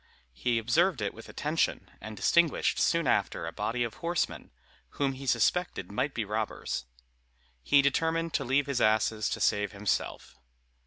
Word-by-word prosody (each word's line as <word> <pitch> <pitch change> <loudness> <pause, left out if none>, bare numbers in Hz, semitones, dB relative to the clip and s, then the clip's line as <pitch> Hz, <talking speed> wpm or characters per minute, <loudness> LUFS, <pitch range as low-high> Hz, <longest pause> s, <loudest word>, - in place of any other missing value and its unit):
He 120 - 0
observed 140 - +2
it 105 -2 -2
with - - -12
attention, - - -1
and 110 +1 -8
distinguished 170 -3 +2
soon 170 -1 +2
after 125 - 0
a - - -4
body 120 +1 -1
of 115 -2 -3
horsemen, 170 0 -2 0.5
whom 140 -1 +1
he 135 +1 -9
suspected 120 - +1
might 135 +7 -1
be 115 - -1
robbers. 105 - -3 0.8
He 140 - +4
determined 160 +4 +1
to - - 0
leave 135 +3 +2
his 140 -3 -1
asses 110 0 +2
to - - -3
save 105 0 +1
himself. 100 -9 -3
120 Hz, 155 wpm, -29 LUFS, 110-150 Hz, 0.8 s, He